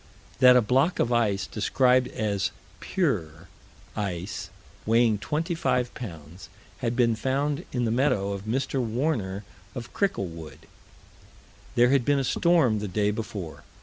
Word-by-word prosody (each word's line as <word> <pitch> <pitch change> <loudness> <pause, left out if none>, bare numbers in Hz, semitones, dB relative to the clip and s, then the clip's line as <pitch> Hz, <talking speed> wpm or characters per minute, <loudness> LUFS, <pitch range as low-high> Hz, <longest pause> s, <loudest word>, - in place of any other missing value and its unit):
That 125 -1 +8
a 125 - +5
block 135 +10 +2
of 120 - +1
ice, 105 -5 +1
described 125 +5 +2
as 100 -4 -1 0.3
"pure" 95 - -2 0.5
ice, 95 -2 -4 0.3
weighing 115 -1 +3
25 150 -4 -1
pounds, 85 - -9 0.3
had 120 +1 -1
been 120 -2 +3
found 140 +7 -1
in 125 -2 -1
the 110 - 0
meadow 115 -6 +1
of 100 0 -6
Mr. 130 +3 -1
Warner, 110 -5 -1 0.3
of 120 -2 -7
Cricklewood. 85 - -3 1.1
There 120 +1 +5
had 135 -3 +3
been 145 +3 +2
a 135 - +1
storm 140 -6 +3
the 105 - -4
day 105 +2 +1
before. 105 -6 -6
115 Hz, 135 wpm, -26 LUFS, 100-130 Hz, 1.1 s, That